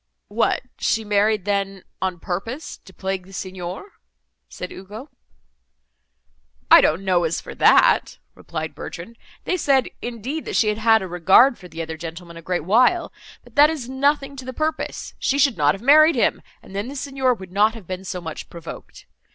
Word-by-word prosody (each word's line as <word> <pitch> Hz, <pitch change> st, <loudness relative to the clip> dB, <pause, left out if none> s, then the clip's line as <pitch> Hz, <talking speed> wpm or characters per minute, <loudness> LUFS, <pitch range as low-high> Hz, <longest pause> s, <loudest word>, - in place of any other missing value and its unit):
"What, 220 Hz, +3 st, +1 dB, 0.2 s
she 220 Hz, 0 st, 0 dB
married, 210 Hz, -1 st, +1 dB
then, 195 Hz, -2 st, -2 dB, 0.2 s
on 185 Hz, -2 st, -2 dB
purpose 225 Hz, -, -5 dB
to -, -, -14 dB
plague 190 Hz, -1 st, -4 dB
the 195 Hz, -, -15 dB
Signor?" 185 Hz, -, -6 dB, 0.6 s
said 180 Hz, -, -7 dB
Ugo. 210 Hz, +9 st, -10 dB, 1.6 s
"I -, -, +10 dB
don't 165 Hz, +6 st, +1 dB
know 180 Hz, -2 st, +2 dB
as 165 Hz, 0 st, -1 dB
for -, -, -9 dB
that," -, -, +4 dB, 0.2 s
replied 160 Hz, -1 st, -6 dB
Bertrand, 180 Hz, +7 st, -8 dB, 0.3 s
"they 370 Hz, -, -1 dB
said, 275 Hz, -5 st, +2 dB
indeed, 245 Hz, +6 st, -5 dB
that -, -, -4 dB
she 215 Hz, -, +3 dB
had 210 Hz, +1 st, -2 dB
had 220 Hz, -1 st, +4 dB
a -, -, -5 dB
regard 190 Hz, +9 st, +4 dB
for 180 Hz, -, -11 dB
the 165 Hz, -1 st, -6 dB
other 160 Hz, 0 st, -6 dB
gentleman 170 Hz, +1 st, -8 dB
a 165 Hz, -, -9 dB
great 175 Hz, -1 st, -2 dB
while; 250 Hz, -, +3 dB, 0.3 s
but -, -, -19 dB
that 295 Hz, -1 st, +6 dB
is 300 Hz, -7 st, -4 dB
nothing 275 Hz, +1 st, 0 dB
to 260 Hz, -, -7 dB
the 260 Hz, -, -6 dB
purpose, 310 Hz, +3 st, -3 dB
she 275 Hz, -, 0 dB
should 275 Hz, -4 st, +3 dB
not 150 Hz, 0 st, +2 dB
have 195 Hz, -, -12 dB
married 310 Hz, +4 st, +6 dB
him, -, -, +1 dB, 0.2 s
and 195 Hz, -, -13 dB
then 200 Hz, +3 st, -2 dB
the 275 Hz, -, -7 dB
Signor 270 Hz, -2 st, 0 dB
would 190 Hz, -4 st, -11 dB
not 210 Hz, +4 st, +3 dB
have 220 Hz, -5 st, -11 dB
been 185 Hz, +1 st, -6 dB
so 185 Hz, -1 st, -5 dB
much 160 Hz, -3 st, -7 dB
provoked. 170 Hz, -2 st, -10 dB
205 Hz, 185 wpm, -22 LUFS, 180-260 Hz, 1.6 s, I